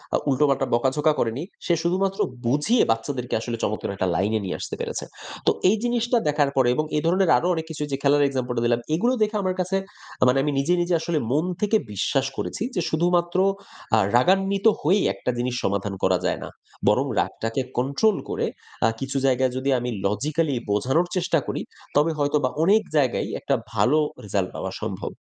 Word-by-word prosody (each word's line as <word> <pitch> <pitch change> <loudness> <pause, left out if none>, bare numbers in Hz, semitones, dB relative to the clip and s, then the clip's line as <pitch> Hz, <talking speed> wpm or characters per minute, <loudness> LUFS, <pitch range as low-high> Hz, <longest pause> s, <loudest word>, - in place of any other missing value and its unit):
অ - - +4
উল্টোপাল্টা 135 0 +2
বকাঝকা 135 +6 +2
করেনি। 120 +6 -1 0.2
সে 175 - +2
শুধুমাত্র 190 +3 0 0.3
বুঝিয়ে, 150 - +3
বাচ্চাদেরকে 125 +2 -2
আসলে 115 0 -4
চমৎকার 105 -1 -2
একটা 95 - -1
লাইনে 105 +3 +1
নিয়ে 90 - -3
আসতে - - -5
পেরেছে। - - -4 0.4
তো - - +5 0.2
এই 205 - +4
জিনিসটা 240 0 +1
দেখার 145 -1 +2
পরে 130 -2 +3
এবং 155 - 0
এই 150 - +2
ধরণের 185 +1 +3
আরো 175 - 0
অনেক 160 -1 -3
কিছু 150 -1 -4
যে, 135 - +1
খেলার 145 +1 +4
এক্সাম্পল 130 -2 -2
টা - - +1
দিলাম; 120 0 +2 0.2
এগুলো 240 +9 +2
দেখে 215 +1 -1
আমার 185 0 0
কাছে 185 +2 0 0.4
আ - - +6
মানে 125 +2 +4
আমি 150 - 0
নিজে, 170 +6 +2
নিজে 175 0 0
আসলে 165 -2 -1
মন 155 +5 +2 0.2
থেকে 210 +1 +3 0.2
বিশ্বাস 135 +7 0
করেছি - - -3
যে, 180 - +1
শুধুমাত্র 175 +2 +1 0.6
আ - - +5 0.2
রাগান্বিত 195 - +2 0.2
হয়েই 190 +7 +3
একটা 125 - -2
জিনিস 125 0 -1
সমাধান 100 0 -1
করা 95 -1 +3
যায় - - 0
না। - - -7 0.4
বরং - - +4
রাগটাকে 115 +4 -1 0.2
কন্ট্রোল 140 - +2
করে, - - -1 0.4
আ - - +6
কিছু 135 0 -3
জায়গায় 130 -1 +2
যদি 130 +1 -1
আমি 125 - -3 0.2
লজিক্যালি 140 +9 0 0.2
বোঝানোর 130 - +1
চেষ্টা 175 -2 +1
করি, - - -2 0.3
তবে 150 +3 +4
হয়তোবা 145 -2 +1
অনেক 210 +5 +5 0.2
জায়গায়ই 135 -4 +1
একটা - - 0 0.2
ভালো 150 +5 +3 0.3
রিসাল্ট 95 -2 -1
পাওয়া - - -4
সম্ভব। - - -4
145 Hz, 185 wpm, -24 LUFS, 125-175 Hz, 0.6 s, আ